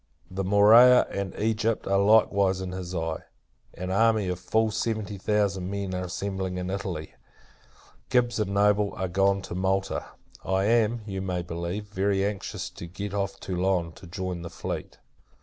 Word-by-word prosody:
The 95 +1 -2
Morea, 110 +6 +7
and 100 -1 -4
Egypt, 110 +1 0
are 100 0 +2
likewise 100 -2 +4
in 95 -1 -4
his 90 -1 -6
eye. 80 -1 -2 0.6
An 90 +1 -4
army 110 -1 +3
of 90 -1 -3
full 110 +3 +1
seventy 105 -2 -2
thousand 100 -2 0
men 100 -1 -3
are 90 0 -2
assembling 95 0 -3
in 90 0 -3
Italy. 90 -5 -4 1.0
Gibbs 120 -2 +2
and 105 -2 -1
Noble 105 0 +3
are 95 - -2
gone 95 +2 +2
to - - -7
Malta. 95 +1 -1 0.4
I 95 0 +1
am, 115 +1 +2
you 95 -3 -4
may 90 -2 -2
believe, 85 +4 -4
very 100 -1 0
anxious 100 -1 -4
to 85 - -9
get 100 +3 -6
off 100 -1 -2
Toulon, 90 -2 -1
to 95 +2 -14
join 90 0 -4
the 85 - -6
fleet. 85 - -6
95 Hz, 165 wpm, -26 LUFS, 90-105 Hz, 1.0 s, Morea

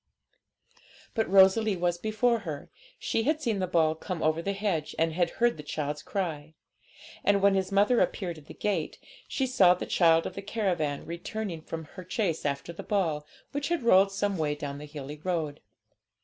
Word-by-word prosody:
But 225 -5 0
Rosalie 195 +2 +5
was 175 0 0
before 220 +4 +1
her. 155 -9 -7 0.3
She 225 - -1
had 305 +6 +1
seen 230 -9 -1
the 185 - 0
ball 160 -3 +3
come 165 +1 -5
over 155 +1 +2
the 200 +3 -2
hedge, 195 -7 -2
and 165 0 +1
had 175 0 +1
heard 240 -3 +3
the - - -6
child's 150 0 -3
cry; 160 -5 -4 0.7
and, 200 0 +4
when 200 0 +4
his 190 0 0
mother 205 +5 +4
appeared 175 -5 -1
at 150 - -19
the - - -10
gate, 210 -1 -2 0.3
she 265 - -1
saw 195 -9 +5
the - - -5
child 165 -2 +4
of - - -4
the 195 - -6
caravan 180 -9 -1
returning 170 +1 -5
from 160 0 -6
her 180 +4 -10
chase 180 -4 -1
after 140 +4 -3
the - - -7
ball, 160 -8 -1 0.2
which 285 0 -2
had 340 -6 -1
rolled 195 -3 +5
some 195 -2 -1
way 150 -1 0
down 145 -1 -5
the 150 - -8
hilly 145 -1 -8
road. 160 -5 -2
180 Hz, 190 wpm, -28 LUFS, 155-205 Hz, 0.7 s, Rosalie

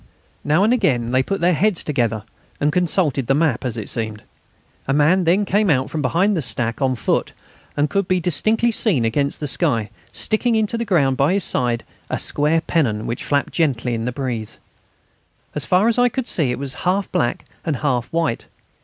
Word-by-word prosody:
Now 155 +6 +2
and 220 +4 +4
again 130 - +1
they 130 +1 +3
put 195 +8 -3
their 180 +1 +3
heads 195 +2 +1
together, 115 -7 -1 0.4
and 150 +1 +1
consulted 165 -7 +1
the 135 - +3
map, 150 -5 +1
as 125 -2 -3
it 110 - -5
seemed. 110 -3 -2 0.6
A 135 - +1
man 160 +6 +3
then 190 +5 +3
came 205 +1 +2
out 130 -3 +1
from 155 - -2
behind 180 +9 +2
the 165 - 0
stack 120 -2 -3
on 130 -1 +2
foot, - - -1 0.4
and 145 +1 +2
could 200 +2 -1
be 185 0 +2
distinctly 215 +7 +1
seen, 185 - +1
against 140 +5 0
the 150 - -3
sky, 120 - +1 0.2
sticking 225 +2 0
into 220 +1 0
the 230 0 -2
ground 140 - +2
by 140 +6 +3
his 200 -1 +1
side 120 -5 0 0.3
a - - -1
square 150 +3 +1
pennon 115 -12 0
which 120 - -4
flapped 140 -1 0
gently 130 -7 0
in 115 0 -2
the 125 - -1
breeze. 120 -5 -4 1.0
As - - 0
far 185 +5 +3
as 235 +1 +2
I 245 0 +4
could 260 +1 -3
see 155 - 0
it 125 - -1
was 135 0 -2
half 190 +2 0
black 120 - -1 0.2
and 160 -4 -1
half 125 -3 -1
white. 165 -8 -2
150 Hz, 200 wpm, -20 LUFS, 125-185 Hz, 1.0 s, and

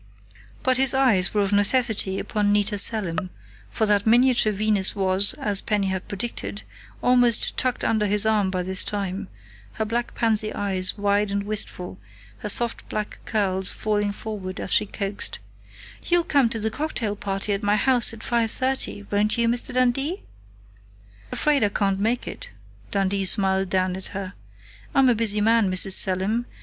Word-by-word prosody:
But 255 -1 +2
his 265 0 +3
eyes 235 -9 +2
were 210 - 0
of 195 - -2
necessity 205 -2 +2
upon 205 0 -1
Nita 205 0 +1
Selim, 185 -5 +1 0.4
for 220 - -1
that 205 0 +1
miniature 240 -1 +3
Venus 210 -1 +1
was, 190 0 +4
as 200 -2 +1
Penny 205 -2 -1
had 190 -1 -5
predicted, 105 - -5 0.4
almost 245 -2 +3
tucked 255 -1 -2
under 215 -2 0
his 210 +1 +3
arm 210 -3 +1
by 185 -1 -3
this 190 +1 -1
time, 200 -1 -5 0.5
her 220 - -3
black 235 +2 -4
pansy 215 -2 +2
eyes 190 -2 0
wide 205 0 0
and 200 0 -2
wistful, 200 - -2 0.4
her 210 - -4
soft 235 +3 0
black 210 -1 -5
curls 190 -4 -1
falling 210 -1 -2
forward 200 -3 -7
as - - -1
she 210 - +3
coaxed: 200 0 -4 0.7
"You'll 350 -1 +3
come 280 -7 +2
to 230 -1 -4
the 220 +1 -2
cocktail 235 -7 -3
party 200 0 -3
at 200 - -3
my 205 -1 +1
house 245 +2 +3
at 225 -1 -11
5:30, 235 -1 -2
won't 210 +2 0
you, 235 0 +1
Mr. 240 +2 0
Dundee?" 255 +8 -1 1.1
"Afraid 295 -5 +1
I 205 - +2
can't 195 -1 -1
make 230 +4 -1
it," - - -7 0.4
Dundee 195 0 -1
smiled 190 -1 +3
down 185 -1 -1
at 190 - -8
her. 195 -1 -6 0.6
"I'm 265 -1 +4
a - - +4
busy 215 -2 +2
man, 225 -1 +2
Mrs. 185 +1 +5
Selim.... 195 +6 +2
210 Hz, 165 wpm, -23 LUFS, 195-230 Hz, 1.1 s, Mrs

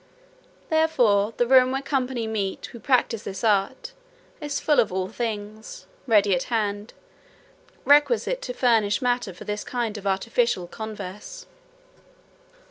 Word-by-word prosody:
Therefore 240 -10 +2
the 240 - +2
room 255 0 +5
where 270 +1 -1
company 260 -4 -1
meet 210 -3 -3
who 235 - -10
practise 245 -3 +1
this 195 -1 -7
art, 215 - 0 0.5
is 295 -1 -3
full 300 - +2
of 220 - +2
all 185 0 -2
things, 220 - -6 0.2
ready 205 -4 +4
at 175 - 0
hand, 210 -2 -2 0.9
requisite 445 +12 +3
to - - -5
furnish 225 -5 +2
matter 245 -5 0
for 180 - -11
this 210 0 -4
kind 230 -4 -3
of 200 - -6
artificial 195 0 0
converse. 215 - -8
225 Hz, 130 wpm, -24 LUFS, 205-260 Hz, 0.9 s, room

